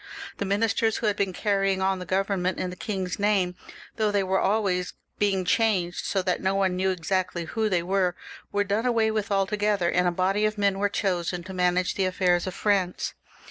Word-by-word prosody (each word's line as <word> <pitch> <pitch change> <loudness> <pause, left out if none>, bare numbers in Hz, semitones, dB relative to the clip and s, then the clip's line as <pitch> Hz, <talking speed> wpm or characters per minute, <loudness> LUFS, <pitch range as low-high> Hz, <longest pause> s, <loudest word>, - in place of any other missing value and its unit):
The 200 - -2
ministers 220 +2 +1
who - - -3
had 210 -1 +2
been 200 -2 0
carrying 195 0 0
on 190 0 +1
the 180 - -7
Government 190 -1 0
in 180 - -3
the - - -7
king's 190 -2 -4
name, 200 -3 +2 0.4
though 215 -2 +2
they 205 -1 +1
were 190 0 +1
always 190 -3 0 0.3
being 195 -3 +1
changed, 185 -4 +1
so 190 -2 0
that 180 -1 0
no 190 +1 +1
one 190 -2 +1
knew 190 +1 +1
exactly 180 -1 -1
who 220 +6 -1
they 175 -3 +1
were, 185 -1 +1 0.4
were 205 0 +1
done 205 +5 0
away 225 -2 +2
with 215 -2 -2
altogether, 200 -2 +1
and 180 0 +2
a - - +2
body 190 +4 +1
of 215 0 -1
men 200 -1 +1
was 205 0 +2
chosen 180 -3 -1
to 190 +2 -8
manage 180 0 +1
the 190 - 0
affairs 185 -1 +1
of 185 - -4
France. 195 -4 0
190 Hz, 205 wpm, -26 LUFS, 180-205 Hz, 0.4 s, had